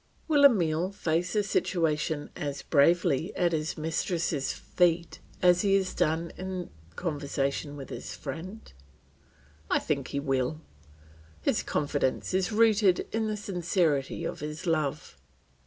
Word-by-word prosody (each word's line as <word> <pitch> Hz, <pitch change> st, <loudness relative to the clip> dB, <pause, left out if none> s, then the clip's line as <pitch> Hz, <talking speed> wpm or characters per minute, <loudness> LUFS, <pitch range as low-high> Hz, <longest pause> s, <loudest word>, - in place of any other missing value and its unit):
Will 290 Hz, -3 st, +5 dB
Emile 180 Hz, -, +3 dB
face 175 Hz, -3 st, -1 dB
the 210 Hz, -1 st, +2 dB
situation 160 Hz, -6 st, 0 dB
as 145 Hz, -1 st, -4 dB
bravely 165 Hz, +2 st, +3 dB
at 175 Hz, -2 st, +2 dB
his 160 Hz, 0 st, -2 dB
mistress' 160 Hz, -2 st, -1 dB
feet 170 Hz, -1 st, 0 dB, 0.2 s
as 175 Hz, -1 st, +6 dB
he 195 Hz, -1 st, +3 dB
has 190 Hz, -1 st, 0 dB
done 160 Hz, +2 st, 0 dB
in 185 Hz, -1 st, -5 dB, 0.2 s
conversation 145 Hz, -2 st, -2 dB
with 135 Hz, -, -8 dB
his -, -, -6 dB
friend? 175 Hz, +10 st, -7 dB, 1.0 s
I -, -, +3 dB
think 140 Hz, -4 st, -1 dB
he 140 Hz, -, -2 dB
will; 135 Hz, +1 st, -1 dB, 0.8 s
his -, -, +2 dB
confidence 145 Hz, +1 st, -1 dB
is 190 Hz, +2 st, +1 dB
rooted 210 Hz, -4 st, +4 dB
in 220 Hz, 0 st, 0 dB
the 215 Hz, -1 st, -2 dB
sincerity 175 Hz, -7 st, 0 dB
of -, -, -4 dB
his 150 Hz, +3 st, -6 dB
love. 155 Hz, -, -1 dB
165 Hz, 130 wpm, -28 LUFS, 145-185 Hz, 1.0 s, as